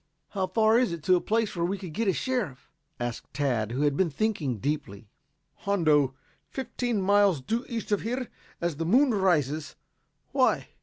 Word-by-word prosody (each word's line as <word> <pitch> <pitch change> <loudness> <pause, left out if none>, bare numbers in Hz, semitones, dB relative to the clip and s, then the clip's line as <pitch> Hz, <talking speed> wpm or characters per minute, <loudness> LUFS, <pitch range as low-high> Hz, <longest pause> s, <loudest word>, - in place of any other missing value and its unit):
"How 190 -2 -1
far 220 +2 +4
is 250 -6 +1
it 170 -3 -5
to 185 +1 +5
a 175 - +1
place 225 -1 0
where 170 - -1
we 190 +4 0
could 185 -5 -8
get 225 +4 -1
a - - +5
sheriff?" 215 - -3 0.3
asked 120 -1 -4
Tad, 120 -7 0
who 130 +4 -2
had 145 -2 +2
been 180 +2 +2
thinking 155 - -1
deeply. 115 -5 -4 0.5
"Hondo. 155 -9 +2 0.3
Fifteen 245 -3 -2
miles 200 -4 +4
due 225 - -2
east 230 -3 -4
of 205 - +2
here 250 +3 -2 0.3
as 170 -4 -2
the 165 - -2
moon 255 +6 +4
rises. 155 -7 +1 0.6
Why?" - - +2
185 Hz, 175 wpm, -27 LUFS, 145-220 Hz, 0.6 s, to